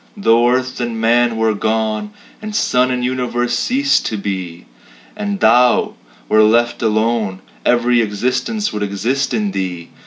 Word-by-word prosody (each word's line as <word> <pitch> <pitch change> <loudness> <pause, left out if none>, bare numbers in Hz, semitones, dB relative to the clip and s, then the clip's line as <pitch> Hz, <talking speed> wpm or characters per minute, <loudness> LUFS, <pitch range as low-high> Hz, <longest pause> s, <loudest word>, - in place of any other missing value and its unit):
Though 120 - +3
earth 130 0 -1
and 120 -2 -3
man 115 +1 +2
were 110 -1 +1
gone, 110 - -1 0.3
And 215 -1 -6
suns 125 -9 +2
and 125 -1 -1
universes 120 -1 -1
ceased 275 +2 +1
to 110 - -3
be, 95 -4 -5 0.5
And 205 -1 -3
Thou 120 +2 +4 0.3
were 110 - +4
left 120 +3 +2
alone, 110 -3 0 0.3
Every 120 0 +3
existence 125 - -2
would 105 - -4
exist 105 +7 -1
in 105 -4 -1
Thee. 90 -3 -5
120 Hz, 145 wpm, -17 LUFS, 110-125 Hz, 0.5 s, Thou